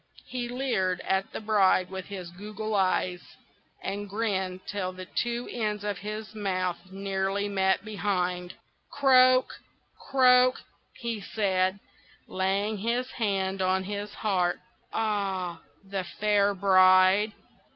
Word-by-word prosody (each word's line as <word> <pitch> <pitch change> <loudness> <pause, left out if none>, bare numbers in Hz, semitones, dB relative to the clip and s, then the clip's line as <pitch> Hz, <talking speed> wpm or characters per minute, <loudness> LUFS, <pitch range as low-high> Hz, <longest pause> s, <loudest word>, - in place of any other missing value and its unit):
He 245 -1 -4
leered 225 -8 0
at 190 0 -1
the - - -5
bride 200 -4 +3
with 190 -1 -5
his 185 -4 -7
goggle 210 +3 -6
eyes, 185 -2 +1 0.6
and 200 +1 -4
grinned 190 -3 -2
till 190 -3 -3
the 185 0 -9
two 240 +5 -2
ends 210 -3 -2
of 205 -3 -3
his 215 +2 -6
mouth 185 -4 -1
nearly 195 +1 -1
met 190 0 +1
behind. 180 -3 -2 0.3
"Croak! 255 -2 +4 0.5
croak!" 255 -1 +5 0.3
he 230 -3 -4
said, 190 -2 0 0.5
laying 195 +3 -1
his 240 +4 -1
hand 195 -4 -1
on 190 0 +1
his 205 +1 -5
heart. 185 -5 0 0.3
"Ah! 195 -6 -2 0.3
the 195 -1 -3
fair 205 +2 +1
bride! 185 +2 +5
200 Hz, 120 wpm, -28 LUFS, 185-215 Hz, 0.6 s, croak